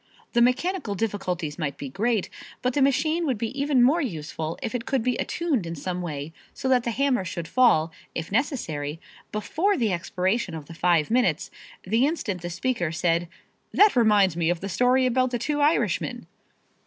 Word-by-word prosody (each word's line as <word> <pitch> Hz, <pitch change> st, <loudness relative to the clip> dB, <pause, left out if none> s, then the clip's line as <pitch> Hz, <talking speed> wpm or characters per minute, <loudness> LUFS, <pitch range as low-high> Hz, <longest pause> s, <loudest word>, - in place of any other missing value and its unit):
The 235 Hz, -, +4 dB
mechanical 255 Hz, -, +1 dB
difficulties 180 Hz, -7 st, -3 dB
might 140 Hz, -4 st, -2 dB
be 140 Hz, -, -6 dB
great, 210 Hz, -, 0 dB, 0.4 s
but 250 Hz, 0 st, +1 dB
the 285 Hz, -, +1 dB
machine 310 Hz, +5 st, +2 dB
would 260 Hz, -5 st, 0 dB
be 225 Hz, +1 st, -2 dB
even 280 Hz, -4 st, +3 dB
more 300 Hz, +8 st, +4 dB
useful 160 Hz, -, -4 dB
if -, -, -3 dB
it 245 Hz, -2 st, -4 dB
could 265 Hz, -4 st, 0 dB
be 250 Hz, 0 st, +1 dB
attuned 290 Hz, -, -1 dB
in 165 Hz, -, -4 dB
some 180 Hz, +4 st, -4 dB
way 155 Hz, -2 st, -5 dB, 0.2 s
so -, -, -3 dB
that 250 Hz, -2 st, +3 dB
the -, -, 0 dB
hammer 260 Hz, -1 st, +1 dB
should 170 Hz, -2 st, -5 dB
fall, 170 Hz, -11 st, +4 dB, 0.2 s
if 165 Hz, +2 st, -4 dB
necessary, 165 Hz, -, -1 dB, 0.3 s
before 320 Hz, -, 0 dB
the 220 Hz, -6 st, +1 dB
expiration 185 Hz, +2 st, -1 dB
of 155 Hz, -2 st, -7 dB
the 165 Hz, -, -11 dB
five 170 Hz, 0 st, +2 dB
minutes, 250 Hz, +1 st, +1 dB, 0.3 s
the 225 Hz, +8 st, +2 dB
instant 210 Hz, -, -3 dB
the 175 Hz, -, -4 dB
speaker 180 Hz, -2 st, -1 dB
said, 170 Hz, +1 st, 0 dB, 0.4 s
"That 415 Hz, -4 st, +5 dB
reminds 210 Hz, -7 st, +4 dB
me 170 Hz, -1 st, +1 dB
of 175 Hz, -1 st, 0 dB
the 195 Hz, -, -5 dB
story 250 Hz, +6 st, +3 dB
about 255 Hz, +1 st, +2 dB
the 245 Hz, -, -1 dB
two 290 Hz, +5 st, -1 dB
Irishmen." 300 Hz, +3 st, +1 dB
220 Hz, 185 wpm, -25 LUFS, 170-255 Hz, 0.4 s, That